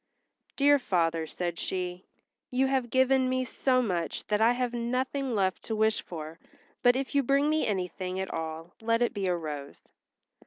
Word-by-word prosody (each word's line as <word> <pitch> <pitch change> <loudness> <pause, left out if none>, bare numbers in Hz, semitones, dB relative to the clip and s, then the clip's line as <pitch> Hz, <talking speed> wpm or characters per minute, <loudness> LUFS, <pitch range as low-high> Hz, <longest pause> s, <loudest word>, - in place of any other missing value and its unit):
"Dear 285 0 +5
father," 165 -7 0
said 175 0 -4
she, 180 -1 -3 0.4
"you 260 +1 +2
have 265 -2 0
given 260 +1 +3
me 255 0 0
so 255 0 +1
much 175 -6 -2
that 210 0 +2
I 230 +2 +5
have 245 -1 -1
nothing 255 +2 -1
left 190 -2 +1
to 225 - -2
wish 220 0 +2
for; 160 -1 -8 0.4
but 245 0 +5
if 270 0 -2
you 280 - +4
bring 275 +3 +2
me 310 0 +1
anything 185 -2 -2
at 190 - -3
all 160 +1 -5
let 230 +1 +2
it 240 - 0
be 200 -3 -2
a 180 - +2
rose." 150 -4 -6
220 Hz, 180 wpm, -29 LUFS, 180-255 Hz, 0.4 s, Dear